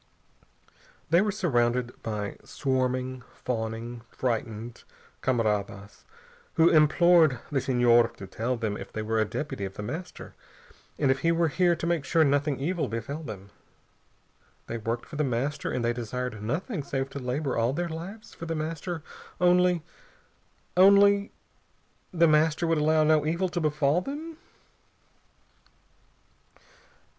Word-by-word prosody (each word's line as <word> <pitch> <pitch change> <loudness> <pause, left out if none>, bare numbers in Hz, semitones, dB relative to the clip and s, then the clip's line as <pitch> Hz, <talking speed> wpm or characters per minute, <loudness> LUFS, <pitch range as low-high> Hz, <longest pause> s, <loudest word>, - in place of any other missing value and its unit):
They 170 +2 +6
were 210 0 +1
surrounded 125 - 0
by 105 -2 -4
swarming, 130 -1 -1
fawning, 115 0 -4
frightened 115 -1 -3 0.4
camaradas 105 -5 -1 0.5
who 165 +1 +6
implored 160 -1 +5
the 135 -2 +1
Senhor 120 -2 +4
to 100 - -8
tell 115 +6 -2
them 110 -3 -2
if - - -9
he 110 - -2
were 110 +1 0
a 110 - +3
deputy 110 0 -4
of 95 0 -5
The 105 - -6
Master, 170 - -7 0.6
and 140 -3 +3
if 135 - 0
he 165 +4 +2
were 165 -1 +2
here 175 +2 +2
to 165 - -5
make 170 -4 0
sure 160 +4 +3
nothing 145 -1 +1
evil 170 +4 -1
befell 115 +8 -4
them. 100 -10 -9 1.1
They 115 - -5
worked 115 +2 -3
for 150 - -9
The 150 - +1
Master, 135 +3 -2
and 120 - -1
they 120 - +1
desired 120 -1 -4
nothing 160 - -2
save 135 -1 -3
to 140 - -5
labor 130 +2 -2
all 115 +2 +2
their 175 +5 -2
lives 175 +7 -8
for 170 - -8
The 165 - -2
Master, 160 +1 -4 0.4
only 180 -1 +3 0.9
only 200 +2 +6 0.8
The 170 -2 +4
Master 155 +2 +3
would 165 -1 +2
allow 155 +1 +3
no 155 0 +4
evil 170 +4 0
to 175 0 -2
befall 150 +1 +2
them? 310 - -6
140 Hz, 140 wpm, -27 LUFS, 120-165 Hz, 1.1 s, They